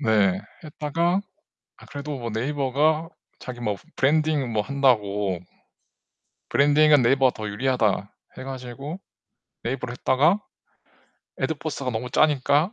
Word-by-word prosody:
네. 105 -7 +3 0.2
했다가 165 +5 0 0.6
아 - - -16
그래도 145 -1 -6
뭐 120 -1 -4
네이버가 145 +6 +1 0.3
자기 125 -1 -8
뭐 105 -3 -1
"브 - - -20
브랜딩 150 -3 +2
뭐 105 -1 +1
한다고" 105 -8 +1 1.1
"브랜딩은 145 -1 +5
네이버가 130 +1 +4
더 110 -1 -6
유리하다." 105 -3 0 0.3
해 - - -6
가지고 135 +5 -7 0.6
네이버로 125 -2 -3
했다가 145 +10 +2 1.0
애드포스트가 150 -4 -2
너무 120 +1 -3
짜니까 150 - +3
135 Hz, 280 characters per minute, -24 LUFS, 115-150 Hz, 1.1 s, 브랜딩은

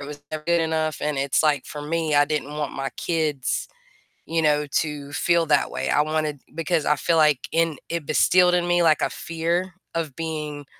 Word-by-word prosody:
was 145 0 -8
never 155 -1 -4
good 170 +1 +2
enough, 160 -1 0
and 150 -1 -1
it's 135 0 +1
like, 150 -2 +2
for 150 - -7
me, 155 0 -1
I 145 - +6
didn't 150 -1 -3
want 150 -1 -3
my 135 0 -3
kids, 155 -6 -1 0.6
you 165 0 0
know, 150 -1 +2 0.2
to 145 -2 -6
feel 170 +2 +2
that 155 - +2
way. - - -3
I 150 - +3
wanted 155 -2 -2
because 165 -1 -1
I 150 - +2
feel 165 +4 +1
like 150 -4 +4
in 165 -2 +1
it 170 -2 -3
instilled 180 +4 +4
in 175 0 +1
me, 175 0 +3
like, 155 -2 +4
a - - +1
fear 170 +2 -2 0.2
of 160 -5 -3
being, 150 -3 -4
155 Hz, 200 wpm, -23 LUFS, 150-165 Hz, 0.6 s, I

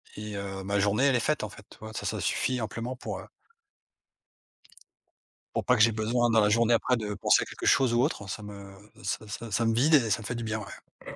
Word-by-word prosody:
et 105 -1 -6
heu, 95 -1 -5
ma 100 +1 0
journée, 105 +6 +2
elle 135 - +4
est 120 - +3
faite 150 +3 0
en 105 - -3
fait, 100 +1 -14
tu - - -15
vois, 110 0 -9
ça, - - -5
ça - - -2
suffit 125 -1 0
amplement 115 +3 -4
pour, 130 - -6
heu - - -11 2.3
pour - - -1
pas 125 - +4
que 110 - +2
j'ai 115 +1 +6
besoin 115 +3 +1
dans 115 -1 +4
la 105 -1 +4
journée 115 +2 +3
après 125 +2 +2
de 105 -2 -3
penser - - +3
à - - -8
quelque - - -8
chose 125 -2 +4
ou 120 - +3
autre, 105 - -2
ça 105 - -5
me 100 -1 -10 0.3
ça 100 +2 -3
ça 110 +2 -7
ça 115 +3 +1
me 115 - +2
vide 145 +8 +4
et 120 -6 +3
ça 110 - +1
me - - -9
fait 120 - -3
du 120 - -4
bien, 110 0 -2
ouais. 100 - -11
110 Hz, 255 wpm, -28 LUFS, 105-120 Hz, 2.3 s, j'ai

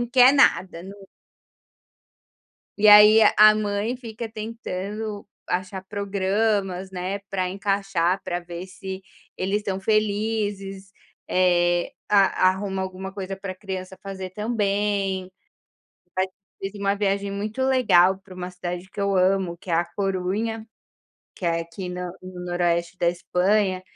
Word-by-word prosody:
não 240 - -1
quer 250 +2 +6
nada, 185 -11 +3
não 195 +1 -11 1.7
E 215 - +5
aí 210 +1 +9
a 215 - +6
a 215 0 +8
mãe 210 +3 -1
fica 230 -2 -7
tentando 215 -1 -5 0.2
achar 185 +1 -2
programas, 200 -1 -1
né, 185 +2 -3
pra 185 -2 -1
encaixar, 195 -2 0
para 175 - -2
ver 175 +1 -8
se 190 0 -7 0.3
eles 195 +3 0
estão 195 -2 -3
felizes, 205 -2 -1 0.4
eh, 175 -1 +2 0.2
a 195 -2 +4
arruma 190 0 -3
alguma 190 +1 -6
coisa 195 -1 -5
para 195 -1 -6
criança 190 -1 -7
fazer 190 -2 -6
também, 200 -3 -1 0.8
vai 185 +1 +1 0.3
fiz 195 0 -4
uma 200 0 +1
viagem 200 0 -1
muito 210 +5 -3
legal 195 -8 +4
para 190 -1 -14
uma 180 0 -6
cidade 180 0 -6
que - - -7
eu 200 0 +1
amo 185 -1 +2
que 180 - -10
é - - +2
a 170 +1 +2
Corunha, 200 +4 -2 0.7
que - - -9
é 170 -1 +1
aqui 170 +3 -7
no 180 0 -4
no 185 -1 -8
noroeste 175 0 0
da 170 - +2
Espanha, 185 +2 +1
195 Hz, 140 wpm, -24 LUFS, 185-205 Hz, 1.7 s, aí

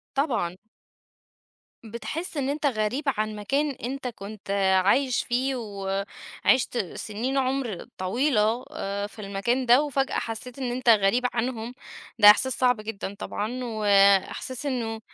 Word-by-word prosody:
طبعًا. 245 - 0 1.3
بتحس 305 +10 -5
إن 275 -2 -1
أنت 290 +1 -1
غريب 235 +3 0
عن 215 -4 -1
مكان 275 +8 0
أنت 265 +1 -5
كنت 210 -3 -9 0.3
عايش 255 +4 +2
فيه 260 +3 0
وعِشت 200 +4 -1 0.2
سنين 235 +6 -3
عمر 260 -6 -1
طويلة 225 +3 +1
آآ 200 +1 -3
في 215 - -16
المكان 210 +6 -1
ده، 245 +4 +6
وفجأة 275 -2 -1
حسّيت 235 +3 -5
إن 255 -2 -2
أنت 250 0 -3
غريب 220 +3 +4
عنهم، 240 0 -2 0.4
ده 210 0 +10
إحساس 260 +5 +3
صعب 250 -3 +3
جدًا 205 -2 -5
طبعًا، 245 +5 -4
وإحساس 210 +4 +2
إنّه 230 -4 -2
235 Hz, 125 wpm, -26 LUFS, 210-260 Hz, 1.3 s, ده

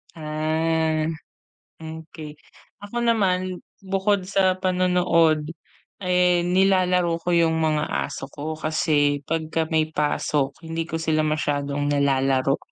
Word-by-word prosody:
Ah, 155 0 0 0.7
okey. 160 -1 -9 0.5
Ako 205 +3 -7
naman, 185 -5 +1 0.2
bukod 195 0 0
sa 185 -1 +2
panonood 180 -4 +2 0.6
ay 180 -1 +3
nilalaro 180 -2 +2
ko 175 - -3
'yung 165 -2 +2
mga 155 -1 +1 0.2
aso - - -6
ko 155 +3 -6
kasi 150 -2 +1
pagka 160 0 -1
may 160 -1 0
pasok 145 -1 0
hindi 165 +1 -4
ko 165 - -2
sila 160 -1 0
masyadong 145 -2 -1
nilalaro, 135 -1 +2
160 Hz, 110 wpm, -23 LUFS, 155-180 Hz, 0.7 s, ay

